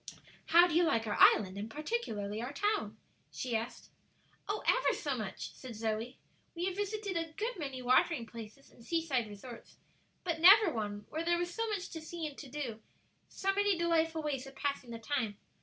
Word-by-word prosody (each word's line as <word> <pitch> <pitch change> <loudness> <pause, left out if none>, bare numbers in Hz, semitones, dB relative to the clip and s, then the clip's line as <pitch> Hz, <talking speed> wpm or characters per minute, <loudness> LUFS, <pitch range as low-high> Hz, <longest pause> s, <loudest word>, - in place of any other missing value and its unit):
"How 345 +1 +8
do 350 - -1
you 345 +2 +5
like 230 -9 +2
our 210 - -1
island, 195 -1 +6
and 210 +2 -5
particularly 225 - -3
our 245 +3 -4
town?" 415 +7 0 0.3
she 250 -3 -3
asked. 225 +2 -4 0.6
"Oh, 415 +1 -2
ever - - +3
so 285 -4 -1
much!" 215 -5 -5
said 255 -3 -9
Zoe. 220 +3 -2 0.4
"We 345 +1 -2
have 375 -1 -1
visited 410 -1 -2
a 330 -1 -2
good 455 +8 -2
many 270 -4 -4
watering 255 +1 +3
places 230 +3 -11
and 235 - -17
sea 330 +6 -1
side 255 -7 0
resorts, 220 +4 -11 0.5
but 335 -3 -1
never 380 +1 +8
one 205 -2 -3
where 320 +1 -2
there 345 +1 +2
was 350 0 -2
so 455 +2 -1
much 395 -3 -3
to 325 - -6
see 325 +1 -5
and 295 -2 -5
to 275 - -9
do; 250 -6 -5 0.5
so 390 0 0
many 405 -1 +2
delightful 325 -2 +1
ways 275 -3 -2
of 270 - -12
passing 280 -4 -2
the 230 - -5
time. 225 -4 -2
295 Hz, 195 wpm, -33 LUFS, 230-345 Hz, 0.6 s, How